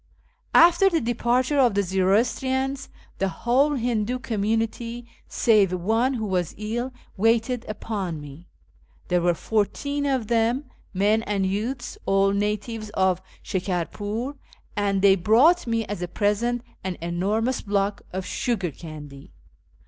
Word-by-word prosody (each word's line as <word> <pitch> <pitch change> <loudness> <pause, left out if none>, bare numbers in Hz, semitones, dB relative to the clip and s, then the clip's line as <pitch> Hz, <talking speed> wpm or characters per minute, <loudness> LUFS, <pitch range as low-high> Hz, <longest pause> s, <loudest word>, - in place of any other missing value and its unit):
After 350 +3 +7
the 335 -3 +1
departure 245 +3 +1
of 245 -6 +4
the 200 - +2
Zoroastrians, 245 +8 0 0.3
the 195 - +1
whole 260 - +2
Hindoo 240 -1 0
community 225 +1 -2 0.2
(save 210 -5 +3
one, 225 +9 +1
who 220 -3 -2
was 180 -4 -1
ill) 235 +5 -3 0.3
waited 230 +3 +1
upon 200 -6 -4
me. 145 +4 -11 0.6
There 180 -1 +2
were 175 0 +2
fourteen 280 - -1
of 260 -5 0
them, 235 +4 +1 0.3
men 205 +3 +2
and 200 -3 -1
youths, 220 +7 -3
all 195 0 +3
natives 210 +2 -2
of 190 -1 +2 0.2
Shikarpnr, 205 - -3 0.4
and 200 -2 0
they 195 -1 +7
brought 240 - +4
me 230 -1 0
as 205 -3 -5
a 180 - -2
present 225 +6 0 0.2
an 185 -2 -3
enormous 200 +9 -1
block 200 0 -1
of 185 0 -4
sugar 200 -9 -1
candy. 145 -2 -10
215 Hz, 130 wpm, -24 LUFS, 190-240 Hz, 0.6 s, After